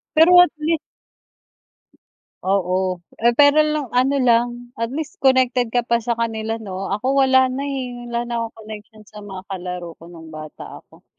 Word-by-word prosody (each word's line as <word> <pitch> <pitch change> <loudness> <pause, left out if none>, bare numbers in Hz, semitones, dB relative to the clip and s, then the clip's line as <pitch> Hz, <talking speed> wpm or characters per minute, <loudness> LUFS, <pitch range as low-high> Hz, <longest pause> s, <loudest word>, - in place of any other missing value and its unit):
Pero 350 +3 +7
at 355 - +5
least 320 +1 0 1.6
Oo, 185 -1 0 0.2
eh, 235 +1 +3
pero 290 +1 +6
nung 300 -5 -2
ano 260 +3 +2
lang 240 -1 +1
at 230 0 -3
least 305 +2 -6
connected 255 -2 +3
ka 240 +1 0
pa 235 0 +1
sa 235 +1 -2
kanila 225 -1 -2
'no. 195 -3 -6
Ako 210 +7 -1
wala 260 -1 +5
na 270 - -3
eh, 260 -3 -4 0.2
wala 235 0 -2
na 240 - -6
akong 230 0 -6
connection 215 0 -11
sa 210 0 -12
mga 195 -2 -9
kalaro 180 -3 -6
ko 170 - -12
nung 160 -2 -12
bata 155 -1 -10
ako, - - -23
235 Hz, 170 wpm, -20 LUFS, 200-260 Hz, 1.6 s, Pero